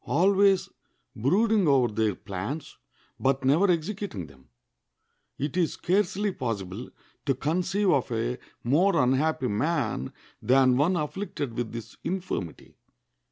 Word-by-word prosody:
Always 195 +3 +4 0.5
brooding 200 - +2
over 130 -6 +3
their 110 -2 +1
plans, 105 - -6 0.4
but 135 0 +1
never 160 +9 +4
executing 175 - -2
them. 65 -3 -19 0.9
It 145 +3 -3
is 175 -3 +1
scarcely 205 +2 0
possible 110 - -4 0.4
to 135 - +2
conceive 180 +8 +1
of 135 -3 +1
a 120 +2 -1 0.2
more 170 +9 +3
unhappy 135 +2 +2
man 110 - -1 0.3
than 130 0 +4
one 155 +8 +2
afflicted 150 - -3
with 120 -2 -3
this 115 -1 -8
infirmity. 180 - -4
140 Hz, 115 wpm, -27 LUFS, 120-185 Hz, 0.9 s, Always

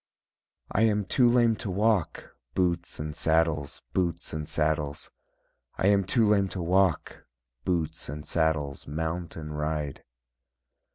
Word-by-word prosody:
I 100 - +1
am 105 -2 +3
too 120 +5 +4
lame 120 -2 +4
to 105 - -4
walk, 100 -2 0 0.2
Boots 85 -2 0
and 75 0 -4
saddles, 80 -3 +1
boots 85 -2 -1
and 75 -1 -4
saddles, 75 -1 -1 0.7
I 95 - +3
am 100 -2 +3
too 115 +4 +3
lame 100 -2 +3
to - - -2
walk, 90 0 +1 0.4
Boots 85 -7 -1
and 75 +1 -6
saddles, 80 -4 0
mount 80 +3 -3
and 75 -2 -6
ride. 75 -1 -3
85 Hz, 130 wpm, -28 LUFS, 75-95 Hz, 0.7 s, too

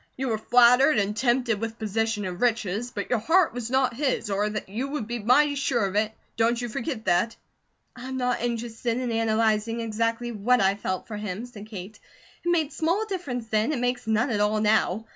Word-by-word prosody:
You 265 0 -2
were 220 -2 -1
flattered, 250 +6 +5
and 205 0 0
tempted 240 -2 +1
with 225 0 -4
position 220 -1 -1
and 180 -1 -5
riches, 230 -1 0
but - - -5
your 245 - +3
heart 330 - +3
was 240 -1 -4
not 260 -1 +2
his, 260 -5 -1
or 205 +2 +1 0.2
you 225 +8 -3
would 275 -5 -3
be 240 +2 -4
mighty 285 +7 +4
SURE 265 -6 0
of 195 0 -4
it, 215 +1 +1 0.3
don't 230 +1 +2
you 240 -1 -3
forget 230 0 -4
that!" 185 +5 +2 0.6
"I 250 +1 -8
am 260 0 -4
not 250 -2 0
interested 235 0 -2
in 250 -2 -2
analyzing 225 0 +1
exactly 230 +1 -1
what 235 +3 +2
I 195 -1 +3
felt 185 -2 -4
for 215 - -6
him," 210 +2 -5
said 215 -4 -11
Kate. 205 -1 -9 0.4
"It 345 - -1
made 320 -4 +1
small 345 +7 0
difference 340 - -4
then; 220 +4 +1
it 270 - -2
makes 245 -1 -1
none 220 +4 +1
at 210 - 0
all 210 +1 +2
now. 215 -1 +2
230 Hz, 205 wpm, -26 LUFS, 215-250 Hz, 0.6 s, flattered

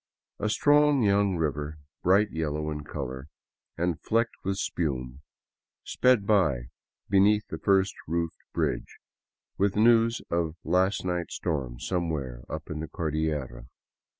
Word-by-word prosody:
A 105 - 0
strong 145 +3 +4
young 100 -1 +3
river, 75 -1 -2 0.2
bright 100 +3 +3
yellow 75 -1 -2
in 75 -1 -5
color 65 -2 -6 0.5
and 85 -1 -1
flecked 115 +1 +1
with 95 0 -1
spume, 65 -8 -3 0.6
sped 125 -5 +3
by 80 - +2 0.4
beneath 105 +2 +4
the - - -5
first 95 -1 +3
roofed 85 0 -2
bridge, - - -2 0.6
with 100 0 +2
news 115 +1 +4
of 85 -2 0
last 90 +4 +1
night's 90 -2 -2
storm 65 -8 -3
somewhere 75 -9 -2
up 80 0 -6
in 75 - -4
the 80 - -4
Cordillera. 75 -6 -3
85 Hz, 125 wpm, -27 LUFS, 75-100 Hz, 0.6 s, strong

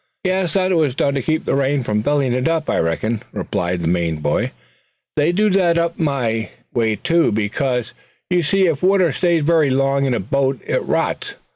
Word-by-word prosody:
"Yes, 185 -3 0
that 185 -1 +1
was 150 -6 +1
done 140 0 +1
to 135 - -1
keep 155 +5 -1
the - - 0
rain 140 0 +1
from 105 -2 0
filling 140 0 +1
it, 125 +3 0
I 165 -2 0
reckoned," 105 +7 -1
replied 90 0 -2
the 85 - -1
Maine 85 -1 0
boy. 75 -1 0 0.7
"They 150 +2 +2
do 210 +4 +2
that 180 -3 +3
up 170 0 -1
my 120 -8 -1 0.2
way 110 -3 +1
too; 170 +8 +1
because 115 +4 -1 0.3
you 180 -1 +2
see, 190 +5 +2
if 160 -5 0
water 185 -3 +3
stays 170 +3 +1
very 160 -2 +3
long 135 +1 +1
in 130 -2 +1
a - - -1
boat 135 +7 0
it - - 0
rots 415 -3 -2
it. - - -23
140 Hz, 195 wpm, -19 LUFS, 115-170 Hz, 0.7 s, that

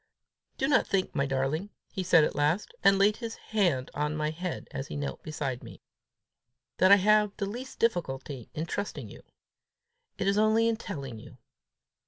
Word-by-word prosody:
"Do 270 - +1
not 275 -2 +3
think, 190 -1 0
my 140 -1 0
darling," 135 +8 -1 0.2
he 190 - -3
said 175 -3 +5
at - - 0
last, 150 +7 0
and 195 0 +6
laid 205 +2 +4
his 230 -2 -5
hand 175 - 0
on 150 +1 -1
my 155 0 0
head 175 +2 -5
as 135 - -5
I - - -5
knelt 145 -1 -4
beside 140 -5 -4
him, - - -10 1.0
"that 185 +1 +5
I - - +12
have 210 +1 +3
the 200 - -1
least 245 +6 -7
difficulty 140 - -1
in 155 - -2
trusting 200 +4 -4
you; - - -12 1.0
it - - -2
is 200 +1 +3
only 220 +1 +4
in 230 -1 +1
telling 135 - -6
you. - - -13
180 Hz, 180 wpm, -29 LUFS, 145-210 Hz, 1.0 s, I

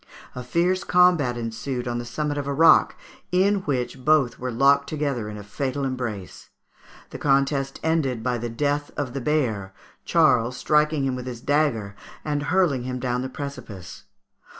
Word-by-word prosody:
A 125 - -6
fierce 175 +8 +1
combat 175 -9 +3
ensued 120 +2 -4
on 120 0 -2
the 120 - -5
summit 145 +4 -3
of 140 - -4
a 140 - -1
rock, 165 +3 +5 0.4
in 195 +3 +3
which 130 -1 -2
both 150 -4 +3
were 125 - -3
locked 140 +3 +3
together 140 -8 -2
in 105 - -7
a 105 - -8
fatal 135 +6 -3
embrace. 120 -8 -5 0.6
The - - -7
contest 135 -1 +1
ended 145 -8 0
by 125 -1 -1
the 120 +1 -4
death 145 +4 -1
of 140 -4 -3
the 135 - -4
bear, 110 -10 -1 0.3
Charles 120 +1 +3
striking 150 -1 +2
him 130 -1 -1
with 125 0 -6
his 120 -2 -6
dagger 120 -8 0 0.3
and 145 -1 -1
hurling 175 -8 +2
him 125 +1 -4
down 125 0 -1
the 130 - -4
precipice. 105 - -8
135 Hz, 170 wpm, -24 LUFS, 120-150 Hz, 0.6 s, rock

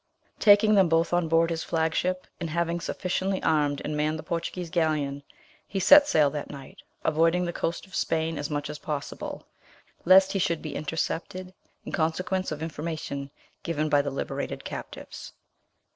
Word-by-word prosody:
Taking 215 0 +6
them 195 -4 +5
both 165 +1 +2
on 175 -1 +2
board 165 +1 +3
his 165 0 -2
flag 160 -1 0
ship, 185 +2 -1
and 170 -2 -3
having 170 +1 -1
sufficiently 185 +3 -2
armed 145 -3 +1
and 150 - -2
manned 155 +1 0
the - - -8
Portuguese 170 0 -4
galleon, 150 -4 0 0.5
he 195 - -3
set 290 +9 +8
sail 150 - +3
that 150 -1 -5
night, 140 -2 -11 0.3
avoiding 165 +3 +3
the 175 - -3
coast 170 +4 -3
of 190 - -20
Spain 160 -3 -1
as 145 - -3
much 145 -1 -2
as 150 - -7
possible, 145 -2 -5 0.6
lest 190 +2 +6
he 195 - -1
should 170 -2 0
be 155 -3 -5
intercepted 170 +4 -3 0.3
in - - -6
consequence 185 +3 -1
of! 155 +1 -4
information 155 -3 -5 0.3
given 155 -2 -1
by 145 -1 +4
the 140 - -3
liberated 135 - -4
captives. - - -8
165 Hz, 170 wpm, -27 LUFS, 150-180 Hz, 0.6 s, set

